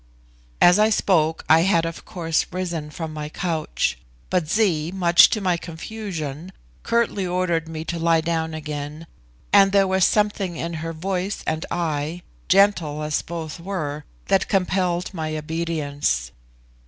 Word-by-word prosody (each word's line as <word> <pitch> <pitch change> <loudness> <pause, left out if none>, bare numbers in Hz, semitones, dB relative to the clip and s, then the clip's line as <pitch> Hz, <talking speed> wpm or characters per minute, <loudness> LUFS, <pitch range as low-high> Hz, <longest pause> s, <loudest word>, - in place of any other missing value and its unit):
As 180 +3 +6
I 215 +1 +5
spoke, 165 -7 +2
I 160 - +6
had 170 -1 +3
of 165 0 -6
course 165 -3 -1
risen 170 -4 -3
from 160 +1 -6
my 150 -1 -5
couch: 160 - -2 0.3
but 175 -4 0
Zee, 175 -6 +1
much 175 -2 +6
to 215 - -1
my 180 -3 +1
confusion, 170 -3 -6 0.3
curtly 230 -5 0
ordered 175 -2 0
me 160 0 -5
to 170 +1 -3
lie 165 0 +3
down 160 -1 -2
again, 150 0 -6 0.5
and 195 -1 +7
there 200 -1 +4
was 190 0 +2
something 205 -4 +1
in 170 +2 -4
her 165 0 -3
voice 185 +4 -3
and 160 0 -2
eye, 160 +1 -2 0.2
gentle 175 -6 +3
as 150 -1 0
both 165 -1 -6
were, 155 -5 -4 0.2
that 195 -1 +2
compelled 180 -1 0
my 155 -3 -3
obedience. 150 - -2
170 Hz, 145 wpm, -23 LUFS, 155-185 Hz, 0.5 s, and